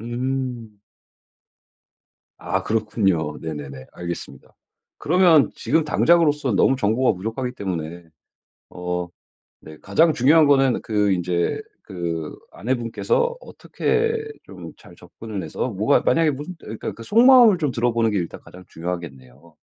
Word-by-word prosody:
음. 120 Hz, -2 st, -4 dB, 1.6 s
아. -, -, -2 dB
그렇군요. 95 Hz, -8 st, 0 dB
네네네. 70 Hz, -4 st, -7 dB
알겠습니다. 85 Hz, -1 st, -8 dB, 0.4 s
그러면 170 Hz, -3 st, +4 dB
지금 155 Hz, +8 st, 0 dB
당장으로서 150 Hz, -5 st, +2 dB
너무 130 Hz, -, +3 dB
정보가 125 Hz, +1 st, +1 dB
부족하기 115 Hz, +6 st, -4 dB
때문에 85 Hz, -5 st, -5 dB, 0.7 s
어 90 Hz, 0 st, -4 dB, 0.5 s
네. 80 Hz, 0 st, -12 dB
가장 160 Hz, +12 st, +3 dB
중요한 150 Hz, +4 st, +4 dB
거는 135 Hz, -3 st, +3 dB
그 105 Hz, -2 st, +1 dB
인제 90 Hz, -1 st, -1 dB, 0.2 s
그 85 Hz, -4 st, -5 dB
아내분께서 130 Hz, -, -1 dB
어떻게 455 Hz, -2 st, -2 dB, 0.3 s
좀 -, -, -11 dB
잘 -, -, -17 dB
접근을 105 Hz, -4 st, -8 dB
해서 80 Hz, +10 st, -4 dB
뭐가 105 Hz, +7 st, +2 dB
만약에 165 Hz, -1 st, +2 dB
무슨 145 Hz, +6 st, -6 dB
예 110 Hz, -, -6 dB
그니까 115 Hz, -, -7 dB
속마음을 235 Hz, -, +6 dB
좀 150 Hz, -5 st, -1 dB
들어보는 115 Hz, -1 st, 0 dB
게 105 Hz, -, 0 dB
일단 85 Hz, -2 st, -5 dB
가장 90 Hz, +1 st, -15 dB
중요하겠네요. 80 Hz, -4 st, -8 dB
115 Hz, 290 characters per minute, -22 LUFS, 90-145 Hz, 1.6 s, 속마음을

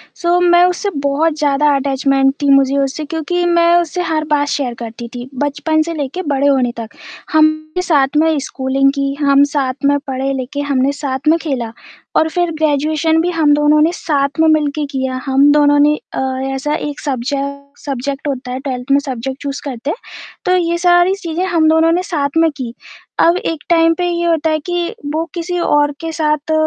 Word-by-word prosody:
सो 350 Hz, 0 st, +1 dB
मैं 350 Hz, 0 st, +5 dB
उससे 360 Hz, +3 st, -1 dB
बहुत 290 Hz, +3 st, +1 dB
ज़्यादा 295 Hz, 0 st, +2 dB
अटैचमेंट 270 Hz, 0 st, +1 dB
थी 285 Hz, -, +1 dB
मुझे 275 Hz, 0 st, +4 dB
उससे 275 Hz, +3 st, -1 dB
क्योंकि 325 Hz, +3 st, -2 dB
मैं 340 Hz, 0 st, +3 dB
उससे 350 Hz, +2 st, -3 dB
हर 315 Hz, -2 st, -1 dB
बात 290 Hz, -1 st, +2 dB
शेयर 270 Hz, -4 st, -2 dB
करती 235 Hz, +1 st, -7 dB
थी, 245 Hz, +2 st, -7 dB
बचपन 295 Hz, +2 st, 0 dB
से 335 Hz, -, -4 dB
लेकर 300 Hz, +5 st, -4 dB
बड़े 280 Hz, 0 st, +1 dB
होने 260 Hz, -3 st, +2 dB
तक। 225 Hz, -1 st, -6 dB, 0.4 s
हमने 310 Hz, +2 st, +2 dB
साथ 290 Hz, -7 st, +2 dB
में 320 Hz, -1 st, +3 dB
स्कूलिंग 270 Hz, +1 st, 0 dB
की, 275 Hz, 0 st, -1 dB
हम 280 Hz, 0 st, +5 dB
साथ 265 Hz, -3 st, 0 dB
में 285 Hz, 0 st, +3 dB
पढ़े-लिखे, 270 Hz, +1 st, -3 dB
हमने 265 Hz, +1 st, +2 dB
साथ 265 Hz, +1 st, -3 dB
में 325 Hz, +2 st, +5 dB
खेला 250 Hz, -7 st, -3 dB, 0.5 s
और 320 Hz, -, +1 dB
फिर 350 Hz, 0 st, -1 dB
ग्रेजुएशन 310 Hz, +2 st, +1 dB
भी 355 Hz, -, 0 dB
हम 310 Hz, -3 st, +3 dB
दोनों 295 Hz, +1 st, +3 dB
ने 325 Hz, +2 st, +3 dB
साथ 285 Hz, -3 st, -1 dB
में 320 Hz, -, +4 dB
मिल 310 Hz, -2 st, +3 dB
के 300 Hz, -1 st, -2 dB
किया, 260 Hz, -1 st, -2 dB
हम 275 Hz, +2 st, +4 dB
दोनों 290 Hz, -1 st, +4 dB
ने 300 Hz, +1 st, +4 dB, 0.2 s
अ, -, -, -3 dB, 0.4 s
ऐसा 295 Hz, +3 st, -2 dB
एक 295 Hz, -1 st, -5 dB
सब्जे 275 Hz, 0 st, -2 dB, 0.5 s
सब्जेक्ट 275 Hz, +1 st, -4 dB
होता 255 Hz, -2 st, -4 dB
है, 255 Hz, -, -3 dB
12th 260 Hz, -1 st, -5 dB
में, 280 Hz, -, +5 dB
सब्जेक्ट 265 Hz, -1 st, -5 dB
चूज़ 280 Hz, 0 st, -4 dB
करते 265 Hz, +1 st, -5 dB
हैं, 425 Hz, -, -2 dB, 0.5 s
तो 365 Hz, 0 st, +3 dB
ये 340 Hz, -1 st, 0 dB
सारी 350 Hz, +2 st, +5 dB
चीज़ें 340 Hz, +2 st, -2 dB
हम 330 Hz, -4 st, +2 dB
दोनों 320 Hz, +1 st, +4 dB
ने 360 Hz, +2 st, +1 dB
साथ 285 Hz, +1 st, -1 dB
में 325 Hz, 0 st, +4 dB
की। 240 Hz, -3 st, -5 dB, 0.5 s
अब 340 Hz, +2 st, +4 dB
एक 325 Hz, -4 st, -4 dB
टाइम 330 Hz, -1 st, +4 dB
पे 355 Hz, 0 st, 0 dB
ये 345 Hz, 0 st, -1 dB
होता 325 Hz, -1 st, +1 dB
है 310 Hz, 0 st, 0 dB
कि 350 Hz, -1 st, -1 dB, 0.2 s
वो 325 Hz, +1 st, -1 dB
किसी 355 Hz, 0 st, -3 dB
और 290 Hz, -3 st, +2 dB
के 325 Hz, 0 st, -4 dB
साथ 305 Hz, -1 st, -1 dB
295 Hz, 195 wpm, -16 LUFS, 275-325 Hz, 0.5 s, मैं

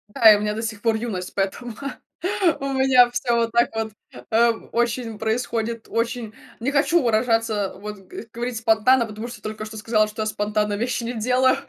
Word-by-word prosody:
Да 220 Hz, -2 st, +8 dB
и 205 Hz, -, +3 dB
у -, -, -4 dB
меня 210 Hz, 0 st, -1 dB
до 220 Hz, -, -3 dB
сих 220 Hz, -2 st, -4 dB
пор 225 Hz, -1 st, +2 dB
юность, 210 Hz, -6 st, -4 dB
поэтому 205 Hz, +4 st, -2 dB, 0.9 s
у 275 Hz, 0 st, -3 dB
меня 260 Hz, -2 st, +5 dB
всё 245 Hz, -1 st, 0 dB
вот 230 Hz, -1 st, +1 dB
так 235 Hz, +1 st, +3 dB
вот, 220 Hz, -1 st, -2 dB, 0.4 s
ам, 230 Hz, 0 st, +2 dB
очень 235 Hz, -1 st, -1 dB
происходит 225 Hz, 0 st, -2 dB
очень 230 Hz, -1 st, -2 dB, 0.3 s
Не 260 Hz, +5 st, -1 dB
хочу 320 Hz, +4 st, +3 dB
выражаться, 225 Hz, -3 st, +1 dB
вот 210 Hz, +1 st, -7 dB
г -, -, -8 dB
говорить 240 Hz, 0 st, -3 dB
спонтанно, 225 Hz, +2 st, +3 dB
потому 215 Hz, +1 st, -7 dB
что 240 Hz, -, -10 dB
только 215 Hz, 0 st, -5 dB
что 220 Hz, 0 st, -9 dB
сказала, 215 Hz, 0 st, +2 dB
что 215 Hz, +1 st, -6 dB
я -, -, -4 dB
спонтанно 210 Hz, 0 st, -1 dB
вещи 240 Hz, +2 st, -2 dB
не 235 Hz, -, -3 dB
делаю, 255 Hz, +3 st, +2 dB
225 Hz, 190 wpm, -23 LUFS, 215-240 Hz, 0.9 s, Да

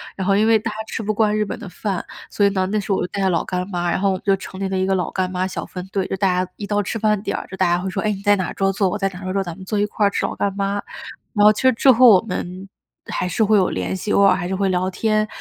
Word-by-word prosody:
然 190 Hz, -, -3 dB
后 195 Hz, +1 st, +3 dB
因 215 Hz, +2 st, +3 dB
为 225 Hz, 0 st, +5 dB
大 215 Hz, -, -4 dB
家 -, -, -8 dB
吃 225 Hz, -, -4 dB
不 215 Hz, +1 st, -1 dB
惯 215 Hz, 0 st, +2 dB
日 215 Hz, -, +2 dB
本 205 Hz, -, -5 dB
的 -, -, -8 dB
饭， 195 Hz, 0 st, -3 dB, 0.3 s
所 205 Hz, -, +1 dB
以 -, -, +5 dB
呢， 190 Hz, -2 st, 0 dB
那 215 Hz, -, +1 dB
时 205 Hz, -, -4 dB
候 -, -, +1 dB
我 -, -, -1 dB
就 -, -, -2 dB
带 200 Hz, -, -5 dB
着 190 Hz, -, +2 dB
老 170 Hz, -2 st, +1 dB
干 180 Hz, 0 st, -3 dB
妈， 175 Hz, -2 st, -1 dB
然 -, -, 0 dB
后 200 Hz, +1 st, +2 dB
我 -, -, +1 dB
们 185 Hz, -, -5 dB
就 200 Hz, -, +4 dB
成 190 Hz, -, -9 dB
立 195 Hz, -1 st, -2 dB
了 190 Hz, -, -1 dB
一 185 Hz, -, +1 dB
个 195 Hz, 0 st, +1 dB
老 180 Hz, -, -2 dB
干 185 Hz, -1 st, -1 dB
妈 185 Hz, 0 st, -1 dB
小 190 Hz, -, -4 dB
分 180 Hz, -1 st, -7 dB
队。 195 Hz, -2 st, -1 dB
就 -, -, -2 dB
大 185 Hz, -2 st, +1 dB
家 -, -, -19 dB
一 205 Hz, -, -6 dB
到 205 Hz, 0 st, 0 dB
吃 205 Hz, -, -3 dB
饭 210 Hz, -2 st, +1 dB
点 -, -, -3 dB
儿， -, -, -6 dB
就 190 Hz, -, -7 dB
大 190 Hz, -, +2 dB
家 175 Hz, 0 st, +2 dB
会 190 Hz, -, -3 dB
说，： 195 Hz, +1 st, -3 dB
“哎， 215 Hz, -, 0 dB
你 195 Hz, -1 st, -5 dB
在 205 Hz, 0 st, +3 dB
哪 185 Hz, -, -3 dB
桌 195 Hz, 0 st, +1 dB
坐？ 195 Hz, 0 st, +1 dB
我 205 Hz, -, -2 dB
在 195 Hz, -1 st, 0 dB
哪 185 Hz, -2 st, -10 dB
桌 185 Hz, 0 st, -3 dB
坐， 195 Hz, 0 st, 0 dB
咱 175 Hz, -2 st, -6 dB
们 190 Hz, -, -10 dB
坐 210 Hz, -, -2 dB
一 205 Hz, -, +2 dB
块 210 Hz, 0 st, +1 dB
吃 -, -, -1 dB
老 -, -, -3 dB
干 200 Hz, -1 st, -1 dB
妈。” 200 Hz, 0 st, -1 dB, 0.5 s
然 205 Hz, -, +3 dB
后 210 Hz, -, +9 dB
其 210 Hz, -, -3 dB
实 260 Hz, 0 st, +5 dB
之 260 Hz, +4 st, +5 dB
后 250 Hz, +1 st, +6 dB
我 195 Hz, -4 st, +7 dB
们 190 Hz, -3 st, -6 dB, 0.4 s
还 -, -, -2 dB
是 200 Hz, +5 st, +1 dB
会 215 Hz, 0 st, +4 dB
有 185 Hz, -2 st, +3 dB
联 -, -, -3 dB
系， 205 Hz, +2 st, -4 dB
偶 -, -, +4 dB
尔 200 Hz, -, +6 dB
还 175 Hz, -2 st, -3 dB
是 190 Hz, -, -2 dB
会 195 Hz, 0 st, 0 dB
聊 185 Hz, 0 st, 0 dB
天， 215 Hz, +2 st, 0 dB
195 Hz, 380 characters per minute, -21 LUFS, 185-210 Hz, 0.5 s, 后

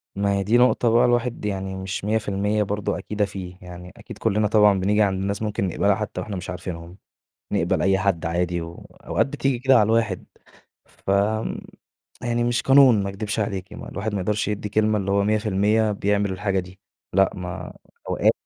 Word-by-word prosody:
ما 100 Hz, 0 st, 0 dB
هي 100 Hz, 0 st, 0 dB
دي 110 Hz, +5 st, +3 dB
نقطة 125 Hz, -1 st, +3 dB
بقى 120 Hz, +2 st, +4 dB
الواحد 120 Hz, -2 st, 0 dB
يعني 95 Hz, -2 st, -3 dB
مش 95 Hz, +1 st, -5 dB
100% 105 Hz, -1 st, 0 dB
برضه 105 Hz, 0 st, -2 dB
أكيدة 105 Hz, -1 st, -2 dB
فيه. 95 Hz, -2 st, -8 dB
يعني 90 Hz, 0 st, -10 dB
أكيد -, -, -11 dB
كُلّنا 105 Hz, +1 st, +1 dB
طبعًا 105 Hz, -2 st, +4 dB
بنيجي 105 Hz, +3 st, +2 dB
عند 95 Hz, -2 st, +1 dB
ناس 100 Hz, +1 st, -2 dB
ممكن 105 Hz, -3 st, -1 dB
نقبلها 100 Hz, +3 st, +2 dB
حتّى 105 Hz, -1 st, -4 dB
وإحنا 105 Hz, -4 st, -5 dB
مش 90 Hz, -1 st, -6 dB
عارفينهم. 90 Hz, -1 st, -7 dB, 0.5 s
نقبل -, -, +1 dB
أي 95 Hz, +1 st, +3 dB
حد 95 Hz, -4 st, 0 dB
عادي 85 Hz, +1 st, -1 dB
وأوقات 85 Hz, +1 st, -3 dB
بتيجي 135 Hz, -2 st, -1 dB
كده 135 Hz, +1 st, +4 dB
على 110 Hz, -, +6 dB
الواحد. 110 Hz, -3 st, 0 dB, 0.6 s
فم 100 Hz, +3 st, -1 dB, 0.6 s
يعني 120 Hz, -1 st, 0 dB
مش 120 Hz, 0 st, 0 dB
قانون 135 Hz, -6 st, +6 dB
ما 100 Hz, -, -2 dB
أكدبش 105 Hz, +2 st, -3 dB
عليكِ. 100 Hz, -2 st, -3 dB
ما -, -, -9 dB
الواحد 105 Hz, +1 st, -4 dB
ما 100 Hz, -, -1 dB
يقدرش 105 Hz, +2 st, -1 dB
يدّي 105 Hz, 0 st, -3 dB
كلمة 110 Hz, +1 st, +2 dB
اللي 100 Hz, -1 st, -2 dB
هو 100 Hz, 0 st, +2 dB
100% 105 Hz, +1 st, +2 dB
بيعمل 100 Hz, -1 st, 0 dB
الحاجة 95 Hz, 0 st, -1 dB
دي. 90 Hz, +1 st, -13 dB, 0.3 s
لأ، 95 Hz, 0 st, +4 dB
ما 90 Hz, 0 st, -7 dB, 0.3 s
أوقات -, -, +3 dB
100 Hz, 180 wpm, -23 LUFS, 95-110 Hz, 0.6 s, على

